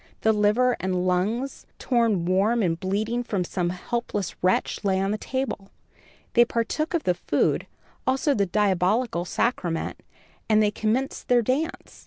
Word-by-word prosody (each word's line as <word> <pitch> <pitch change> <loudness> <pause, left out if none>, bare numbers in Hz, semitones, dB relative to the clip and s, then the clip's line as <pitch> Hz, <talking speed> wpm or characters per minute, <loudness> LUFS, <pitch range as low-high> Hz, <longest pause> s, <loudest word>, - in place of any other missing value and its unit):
The 220 - +4
liver 215 +4 +3
and 185 -1 -1
lungs, 210 +9 -1
torn 230 -8 +1
warm 205 +6 +2
and 165 -2 0
bleeding 210 +6 -1
from 200 -6 -1
some 175 0 -2
helpless 205 +1 -3
wretch, 185 +4 +1
lay 190 -2 +2
on 195 +1 0
the 215 - -1
table. 255 -7 -3 0.6
They 240 - +7
partook 240 +8 -1
of 330 - 0
the 180 - +2
food, - - 0 0.4
also 270 +3 +2
the 200 -5 +1
diabolical 195 +1 +1
sacrament, 175 -6 -1 0.5
and 215 -1 +5
then 205 - +2
commenced 230 +6 -1
their 245 -1 +4
dance. 280 +8 -2
210 Hz, 150 wpm, -25 LUFS, 185-240 Hz, 0.6 s, They